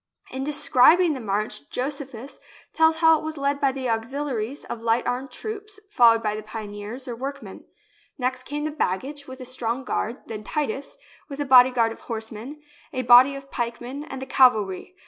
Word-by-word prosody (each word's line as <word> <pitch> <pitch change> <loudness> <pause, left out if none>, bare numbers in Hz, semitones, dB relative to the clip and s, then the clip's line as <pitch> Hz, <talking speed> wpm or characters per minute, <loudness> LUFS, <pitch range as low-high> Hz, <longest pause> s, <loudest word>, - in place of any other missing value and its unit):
In 265 +1 -4
describing 300 +3 +4
the 270 - -5
march 205 - -3
Josephus 270 -1 -5 0.3
tells 320 0 +4
how 320 -1 +5
it - - -10
was 315 0 -5
led 280 +1 -1
by 275 -1 +3
the 260 -1 -4
auxiliaries 250 +2 -3
of 230 - -6
light 230 +1 +1
armed 250 +2 -2
troops, 425 -1 -7
followed 230 - +5
by 210 -1 0
the 215 - -5
pioneers, 215 +3 -7
or 240 - -4
workmen. 275 +4 -7 0.5
Next 255 -1 -1
came 295 +3 -4
the 310 - -2
baggage, 285 +3 -3
with 260 0 -9
a 255 - -7
strong 250 0 -3
guard, 240 -1 -3
then 215 -2 -7
Titus, 280 +1 -3 0.3
with 280 0 -7
a 290 - -1
bodyguard 250 -3 +6
of - - -9
horsemen, 230 +6 -6 0.3
a 255 -4 -2
body 250 +3 +7
of 275 0 -10
pikemen, 240 +3 -4
and 270 - -7
the 265 - -5
cavalry. 230 - +2
255 Hz, 180 wpm, -24 LUFS, 230-285 Hz, 0.5 s, body